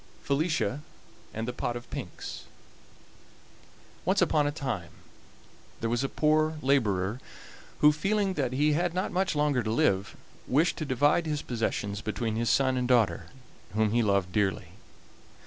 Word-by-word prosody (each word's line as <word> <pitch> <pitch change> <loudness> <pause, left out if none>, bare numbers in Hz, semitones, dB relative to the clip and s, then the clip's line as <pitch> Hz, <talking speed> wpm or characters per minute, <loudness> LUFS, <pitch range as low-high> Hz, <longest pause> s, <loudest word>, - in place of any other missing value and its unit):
FELICIA 140 - 0 0.5
AND 110 +1 -4
THE 125 - -3
POT 120 -1 -3
OF 120 - -7
PINKS - - -7 1.6
Once - - +2
upon 150 -2 +3
a - - 0
time 130 - -4 0.9
there 115 - -2
was 120 +2 0
a 135 - -1
poor 155 +1 +2
laborer 110 -6 +1 0.6
who, 150 - +8
feeling 195 +6 0
that 135 -7 -1
he 150 +3 +2
had 175 +2 0
not 185 +2 -1
much 190 -1 0
longer 145 -3 +2
to 110 - -3
live, 100 -3 +1 0.3
wished 155 +7 +2
to 155 - -3
divide 145 +5 +2
his 150 -1 -2
possessions 105 -4 -2
between 110 0 -2
his 115 +1 0
son 130 -1 +3
and 125 -1 0
daughter, 105 -10 +2 0.5
whom 110 -1 +2
he 120 +2 +3
loved 100 -4 +1
dearly. 100 -2 0
130 Hz, 150 wpm, -28 LUFS, 110-150 Hz, 1.6 s, who